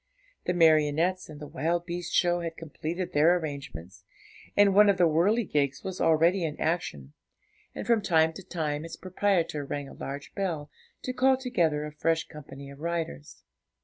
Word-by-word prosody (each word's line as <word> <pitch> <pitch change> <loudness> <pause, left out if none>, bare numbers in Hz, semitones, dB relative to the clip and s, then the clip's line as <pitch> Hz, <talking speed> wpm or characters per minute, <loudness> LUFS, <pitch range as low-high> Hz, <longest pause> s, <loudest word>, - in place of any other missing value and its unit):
The 180 - 0
marionettes 160 +2 +3
and 150 -1 -10
the 150 - -7
wild 165 +5 -1
beast 175 0 -5
show 175 -1 +3
had 165 -1 -5
completed 165 +3 -5
their 160 +4 +5
arrangements, 95 - -7 0.5
and 205 -1 +6
one 205 +1 +7
of 200 - +3
the 175 - +5
whirligigs 165 - +1
was 190 -1 -5
already 165 +3 +3
in 155 -2 -3
action, 75 - -2 0.6
and - - -5
from 230 -2 +3
time 160 -4 +3
to 195 - -9
time 155 -4 -3
its 165 - -7
proprietor 185 -5 0
rang 140 0 -4
a - - -11
large 140 +1 -7
bell, 165 -7 -3 0.3
to 255 - -3
call 260 +1 +3
together 170 - 0
a 150 - -6
fresh 160 +2 0
company 140 -2 -10
of 140 - -13
riders. 165 -2 -4
165 Hz, 170 wpm, -28 LUFS, 150-180 Hz, 0.6 s, one